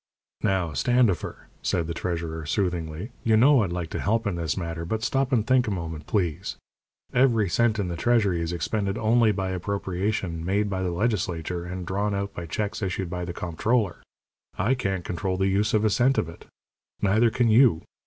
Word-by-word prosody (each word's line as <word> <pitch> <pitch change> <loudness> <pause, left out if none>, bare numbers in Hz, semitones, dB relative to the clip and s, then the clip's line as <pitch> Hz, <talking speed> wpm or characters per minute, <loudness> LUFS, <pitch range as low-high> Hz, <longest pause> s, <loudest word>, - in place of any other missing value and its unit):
"Now, 95 -6 0
Standifer," 120 - +1
said 85 - 0
the 85 - -3
treasurer, 85 -2 -3
soothingly, 90 - -2
"you 110 -1 +4
know 135 +2 +6
I'd 95 -4 -1
like 85 -2 -4
to - - -3
help 115 +3 +1
in 100 - 0
this 85 -1 -2
matter, 85 -2 -4
but 110 +6 -3
stop 135 +2 +1
and 115 -5 +2
think 130 -1 +3
a - - +1
moment, 80 -5 -4
please. 90 -3 -1 0.6
Every 120 -5 +3
cent 110 +5 +2
in 100 -3 -1
the 85 - -3
treasury 100 -3 +2
is 85 0 -2
expended 100 +4 -1
only 115 0 +4
by 95 -2 -2
appropriation 95 -2 -2
made 100 +3 0
by 95 -1 -1
the 95 - 0
legislature, 85 -3 -1
and 90 0 -5
drawn 100 +3 -1
out 100 0 -3
by 85 -1 -6
checks 105 +6 -3
issued 95 -2 -2
by 90 -1 -3
the 85 - -4
comptroller. 95 +4 0 0.6
I 110 +8 +2
can't 95 -8 -2
control 95 +1 -2
the 95 +1 +2
use 105 +3 +1
of 110 0 +2
a 110 - +3
cent 130 +5 +3
of - - +1
it. 85 - -12 0.6
Neither 110 +4 +4
can 115 +1 +1
you. 115 -6 +5
95 Hz, 195 wpm, -26 LUFS, 85-110 Hz, 0.6 s, know